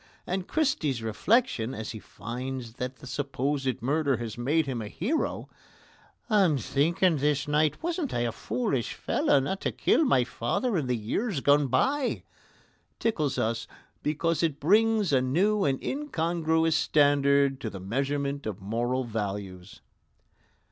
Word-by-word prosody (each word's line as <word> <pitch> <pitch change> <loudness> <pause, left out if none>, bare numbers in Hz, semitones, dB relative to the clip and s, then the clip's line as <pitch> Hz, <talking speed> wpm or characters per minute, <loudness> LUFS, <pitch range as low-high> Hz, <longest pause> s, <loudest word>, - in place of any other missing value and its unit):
And 185 0 -3
Christy's 160 - 0
reflection, 130 - +1
as 110 0 -5
he 110 - -7
finds 120 +3 -6
that 125 +1 -4
the 135 - -14
supposed 135 -1 -2
murder 140 0 +1
has 115 -2 -5
made 145 +7 +1
him 130 -4 -3
a 105 - -5
hero 230 - -2 0.8
"I'm 195 - +3
thinking 160 - +2
this 145 0 +1
night 150 - +1
wasn't 335 -4 -2
I 120 - -1
a 120 -1 0
foolish 135 - -2
fellow 145 - +2
not 145 +9 -3
to - - -1
kill - - +2
my 135 - +3
father 120 - -1
in 150 -7 0
the 125 -1 0
years 155 - -2
gone 145 +1 +4
by" 270 - +1 0.7
tickles 155 - 0
us 115 +1 -1 0.3
because 155 +2 0
it 155 -4 0
brings 210 +1 +3
a 130 - +4
new 190 +11 +2
and 135 -2 +1
incongruous 165 - 0
standard 140 -2 +3
to 110 - -3
the 100 - -8
measurement 140 +6 -2
of 105 -2 -4
moral 120 +6 -1
values. 100 -5 -5
140 Hz, 145 wpm, -28 LUFS, 120-170 Hz, 0.8 s, gone